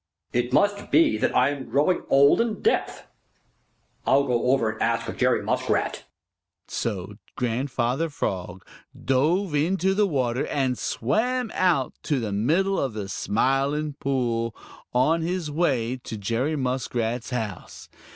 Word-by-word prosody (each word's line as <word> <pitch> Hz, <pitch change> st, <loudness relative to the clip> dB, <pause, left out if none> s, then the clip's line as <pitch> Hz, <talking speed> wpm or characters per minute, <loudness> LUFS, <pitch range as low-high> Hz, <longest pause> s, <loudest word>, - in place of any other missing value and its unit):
"It 120 Hz, +1 st, 0 dB
must 205 Hz, +8 st, +2 dB
be 320 Hz, -2 st, +4 dB
that -, -, 0 dB
I 125 Hz, +2 st, +4 dB
am 135 Hz, -4 st, -6 dB
growing 145 Hz, +9 st, +2 dB
old 140 Hz, +9 st, +5 dB
and 230 Hz, -2 st, -2 dB
deaf. 450 Hz, -, 0 dB, 1.0 s
I'll 140 Hz, +1 st, +4 dB
go 125 Hz, -4 st, 0 dB
over 125 Hz, -4 st, +2 dB
and 110 Hz, -, -10 dB
ask 115 Hz, 0 st, 0 dB
Jerry -, -, +2 dB
Muskrat." -, -, -1 dB, 0.6 s
So 100 Hz, -2 st, -4 dB, 0.2 s
Grandfather 125 Hz, +4 st, -1 dB
Frog 95 Hz, -9 st, -4 dB, 0.3 s
dove 155 Hz, +8 st, +1 dB
into 185 Hz, +6 st, +1 dB
the 205 Hz, +1 st, +2 dB
water 130 Hz, -6 st, -1 dB
and 135 Hz, -3 st, 0 dB
swam 230 Hz, -, -1 dB
out 170 Hz, -8 st, +1 dB
to 145 Hz, -3 st, 0 dB
the 110 Hz, -3 st, -3 dB
middle 165 Hz, -, +1 dB
of 135 Hz, -5 st, -1 dB
the 100 Hz, -2 st, -5 dB
Smiling 135 Hz, +8 st, 0 dB
Pool, 120 Hz, -5 st, -1 dB, 0.4 s
on 150 Hz, +7 st, +2 dB
his 170 Hz, -2 st, -2 dB
way 130 Hz, -7 st, 0 dB
to 120 Hz, -3 st, -7 dB
Jerry 115 Hz, +9 st, -1 dB
Muskrat's 125 Hz, -3 st, -2 dB
house. 110 Hz, -7 st, -5 dB
135 Hz, 135 wpm, -25 LUFS, 120-160 Hz, 1.0 s, old